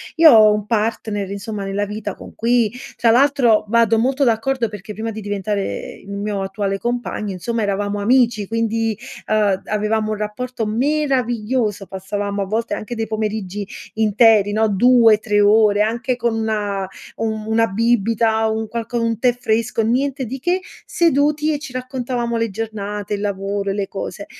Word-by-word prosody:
Io 325 Hz, -2 st, +8 dB
ho 215 Hz, -2 st, +7 dB
un 210 Hz, -1 st, -1 dB
partner, 210 Hz, -2 st, -1 dB
insomma, 200 Hz, +1 st, -5 dB
nella 195 Hz, +1 st, -2 dB
vita 205 Hz, -1 st, -5 dB
con -, -, -12 dB
cui, 235 Hz, -2 st, +2 dB, 0.3 s
tra 230 Hz, -, +4 dB
l'altro, 250 Hz, -4 st, +4 dB
vado 230 Hz, 0 st, +3 dB
molto 265 Hz, +4 st, +1 dB
d'accordo, 235 Hz, +1 st, +1 dB
perché 210 Hz, 0 st, -8 dB
prima 225 Hz, +2 st, -4 dB
di 220 Hz, 0 st, -7 dB
diventare 205 Hz, 0 st, -3 dB
il -, -, -12 dB
mio 200 Hz, 0 st, -3 dB
attuale 195 Hz, 0 st, -2 dB
compagno, 235 Hz, -2 st, -3 dB
insomma, 230 Hz, +6 st, -3 dB
eravamo 205 Hz, 0 st, -1 dB
amici 230 Hz, -1 st, +2 dB
quindi, 225 Hz, -1 st, -1 dB, 0.3 s
uhm, 205 Hz, -3 st, +2 dB
avevamo 215 Hz, +1 st, 0 dB
un 215 Hz, -, -2 dB
rapporto 225 Hz, +3 st, -4 dB
meraviglioso, 245 Hz, -4 st, 0 dB
passavamo 200 Hz, +1 st, -4 dB
a -, -, -1 dB
volte 225 Hz, +4 st, -2 dB
anche 240 Hz, +3 st, -5 dB
dei 225 Hz, -1 st, -3 dB
pomeriggi 210 Hz, -2 st, -3 dB, 0.3 s
interi, 215 Hz, -1 st, +4 dB
no, 220 Hz, +1 st, +2 dB
2-3 215 Hz, -1 st, +4 dB
ore, 210 Hz, 0 st, +4 dB
anche 235 Hz, +4 st, 0 dB
con 235 Hz, -1 st, -1 dB
una 210 Hz, -3 st, -2 dB, 0.3 s
un 220 Hz, -1 st, -2 dB
una 225 Hz, +1 st, +2 dB
bibita, 225 Hz, +1 st, +1 dB
un 220 Hz, 0 st, -2 dB
qualco 235 Hz, 0 st, -3 dB
un 230 Hz, -2 st, -1 dB
tè 245 Hz, 0 st, +3 dB
fresco, 225 Hz, -1 st, 0 dB
niente 260 Hz, +4 st, 0 dB
di 260 Hz, +4 st, -6 dB
che, 355 Hz, +7 st, 0 dB, 0.2 s
seduti 300 Hz, -1 st, +2 dB
e 295 Hz, -, -2 dB
ci 285 Hz, -, -8 dB
raccontavamo 250 Hz, -2 st, -3 dB
le 230 Hz, 0 st, 0 dB
giornate, 210 Hz, -1 st, -4 dB
il 200 Hz, -, -6 dB
lavoro 200 Hz, 0 st, -2 dB
e -, -, 0 dB
le 200 Hz, -1 st, -2 dB
cose. 200 Hz, +1 st, -6 dB
220 Hz, 160 wpm, -20 LUFS, 205-235 Hz, 0.3 s, Io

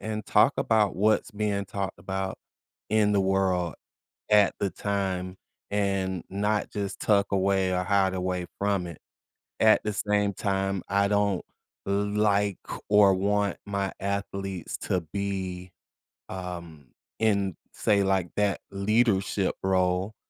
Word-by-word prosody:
and 110 Hz, -1 st, -4 dB
talk -, -, +4 dB
about 105 Hz, -4 st, +2 dB
what's 110 Hz, +3 st, +2 dB
being 105 Hz, -1 st, -1 dB
talked 95 Hz, -3 st, -4 dB
about 95 Hz, +1 st, -3 dB, 0.5 s
in 105 Hz, -1 st, +3 dB
the 100 Hz, -, +3 dB
world 95 Hz, -3 st, +1 dB, 0.6 s
at 105 Hz, -1 st, +5 dB
the 100 Hz, -, 0 dB
time 95 Hz, -2 st, -2 dB, 0.4 s
and 95 Hz, -3 st, 0 dB
not 105 Hz, +2 st, 0 dB
just 100 Hz, -1 st, -4 dB
tuck 100 Hz, -2 st, +2 dB
away 95 Hz, -1 st, +2 dB
or 90 Hz, -, +1 dB
hide 95 Hz, -1 st, +2 dB
away 90 Hz, -1 st, -2 dB
from 100 Hz, -3 st, +1 dB
it. 85 Hz, -3 st, -8 dB, 0.6 s
At 110 Hz, 0 st, +5 dB
the 105 Hz, -, -1 dB
same 105 Hz, 0 st, +1 dB
time, 95 Hz, -1 st, -1 dB
I 100 Hz, +1 st, +2 dB
don't 100 Hz, -2 st, +1 dB, 0.4 s
like 100 Hz, 0 st, +1 dB, 0.3 s
or 105 Hz, -2 st, +6 dB
want 100 Hz, +1 st, 0 dB
my 100 Hz, -1 st, -2 dB
athletes 100 Hz, -2 st, -3 dB
to 90 Hz, -2 st, -1 dB
be, 95 Hz, -2 st, -3 dB, 0.6 s
um, 85 Hz, -6 st, -8 dB, 0.3 s
in, 100 Hz, -5 st, +1 dB, 0.2 s
say 100 Hz, -2 st, +2 dB
like, 95 Hz, -2 st, +1 dB
that 105 Hz, -1 st, +1 dB
leadership 100 Hz, -1 st, +1 dB
role, 95 Hz, +2 st, +1 dB
100 Hz, 125 wpm, -27 LUFS, 95-105 Hz, 0.6 s, or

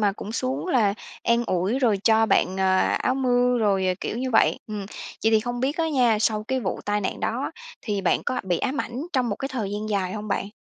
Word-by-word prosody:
mà 205 Hz, -2 st, +3 dB
cũng 210 Hz, +1 st, -7 dB
xuống 255 Hz, +7 st, -2 dB
là 225 Hz, -, +2 dB, 0.3 s
an 235 Hz, 0 st, +2 dB
ủi 185 Hz, +8 st, 0 dB
rồi 230 Hz, -6 st, +3 dB
cho 225 Hz, 0 st, +5 dB
bạn, 190 Hz, -3 st, +2 dB
ờ, 190 Hz, 0 st, +3 dB
áo 255 Hz, -, +1 dB
mưa 250 Hz, -1 st, +2 dB
rồi, 195 Hz, -4 st, +2 dB
ờ, 185 Hz, -, +2 dB
kiểu -, -, -3 dB
như 260 Hz, 0 st, -2 dB
vậy. 225 Hz, -, +4 dB
Ừm, 210 Hz, -1 st, -5 dB, 0.4 s
vậy 225 Hz, -, +5 dB
thì 220 Hz, -, +5 dB
không 245 Hz, +1 st, -4 dB
biết 275 Hz, +4 st, 0 dB
á 330 Hz, -2 st, +1 dB
nha, 245 Hz, -7 st, +3 dB
sau 215 Hz, -1 st, +1 dB
cái 260 Hz, 0 st, 0 dB
vụ 190 Hz, -6 st, -3 dB
tai 205 Hz, 0 st, 0 dB
nạn 195 Hz, -, -3 dB
đó -, -, -1 dB, 0.3 s
thì 205 Hz, -3 st, -2 dB
bạn 185 Hz, -, +1 dB
có 255 Hz, -, 0 dB
bị 180 Hz, -3 st, 0 dB
ám 275 Hz, +1 st, -1 dB
ảnh 240 Hz, +2 st, -5 dB
trong 255 Hz, -3 st, +1 dB
một 205 Hz, -, -2 dB
cái 270 Hz, -, -4 dB
thời 235 Hz, -8 st, -3 dB
gian 210 Hz, +1 st, -3 dB
dài 190 Hz, -3 st, -1 dB
hông 215 Hz, 0 st, -5 dB
bạn? 200 Hz, -, -1 dB
220 Hz, 250 wpm, -24 LUFS, 200-255 Hz, 0.4 s, cho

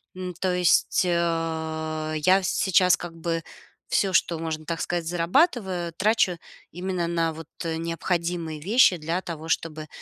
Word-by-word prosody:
М 185 Hz, -1 st, -5 dB
то 180 Hz, +1 st, -1 dB
есть, 180 Hz, +1 st, +3 dB
а, 160 Hz, -2 st, -1 dB
я 185 Hz, +6 st, +4 dB
сейчас 180 Hz, -1 st, +3 dB
как 170 Hz, -1 st, -8 dB
бы 165 Hz, 0 st, -2 dB, 0.5 s
всё, 195 Hz, -2 st, +1 dB
что 170 Hz, -2 st, +2 dB
можно, 160 Hz, -1 st, -4 dB
так 165 Hz, 0 st, -3 dB
сказать, 175 Hz, -1 st, -2 dB
зарабатываю, 180 Hz, -, +1 dB
трачу 190 Hz, -2 st, +2 dB, 0.3 s
именно 180 Hz, 0 st, -2 dB
на 165 Hz, -1 st, 0 dB
вот, 160 Hz, -1 st, -9 dB, 0.2 s
э, 160 Hz, -1 st, -1 dB
необходимые 165 Hz, -1 st, -2 dB
вещи 200 Hz, -, +5 dB
для 165 Hz, +3 st, -2 dB
того, 165 Hz, -1 st, -7 dB
чтобы, 155 Hz, -1 st, -2 dB
170 Hz, 145 wpm, -25 LUFS, 160-180 Hz, 0.5 s, вещи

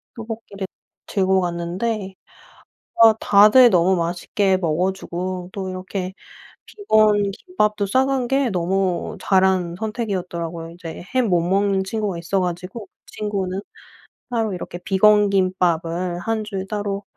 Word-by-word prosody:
떡볶이를 220 Hz, -3 st, -7 dB, 0.4 s
들고 190 Hz, -1 st, +2 dB
갔는데 185 Hz, +4 st, -3 dB, 0.9 s
아 225 Hz, -1 st, +9 dB
다들 215 Hz, +5 st, +7 dB
너무 185 Hz, +1 st, +4 dB
맛있게 180 Hz, +3 st, 0 dB
먹어 180 Hz, +2 st, 0 dB
주고 180 Hz, -1 st, -5 dB
또 190 Hz, -2 st, -4 dB
이렇게 185 Hz, 0 st, -5 dB, 0.5 s
비건 215 Hz, -, +2 dB
김밥도 210 Hz, -, -1 dB
싸간 260 Hz, +2 st, +1 dB
게 270 Hz, -1 st, +1 dB
너무 185 Hz, -1 st, -1 dB
잘 190 Hz, -1 st, +3 dB
한 180 Hz, -3 st, 0 dB
선택이었더라고요. 180 Hz, -7 st, -4 dB
이제 170 Hz, 0 st, -9 dB
햄 245 Hz, -5 st, +2 dB
못 175 Hz, -2 st, +3 dB
먹는 195 Hz, +2 st, +1 dB
친구가 205 Hz, -3 st, -3 dB
있어 180 Hz, +3 st, -1 dB
가지고 180 Hz, +4 st, -5 dB
그 -, -, -67 dB, 0.2 s
친구는 195 Hz, -3 st, -3 dB, 0.7 s
따로 225 Hz, -4 st, -1 dB
이렇게 175 Hz, 0 st, -6 dB
비건 210 Hz, +2 st, +4 dB
김밥을 175 Hz, -2 st, 0 dB
1 225 Hz, +1 st, -2 dB
줄 195 Hz, -3 st, -5 dB
따로 205 Hz, -1 st, -3 dB
190 Hz, 265 characters per minute, -21 LUFS, 180-210 Hz, 0.9 s, 아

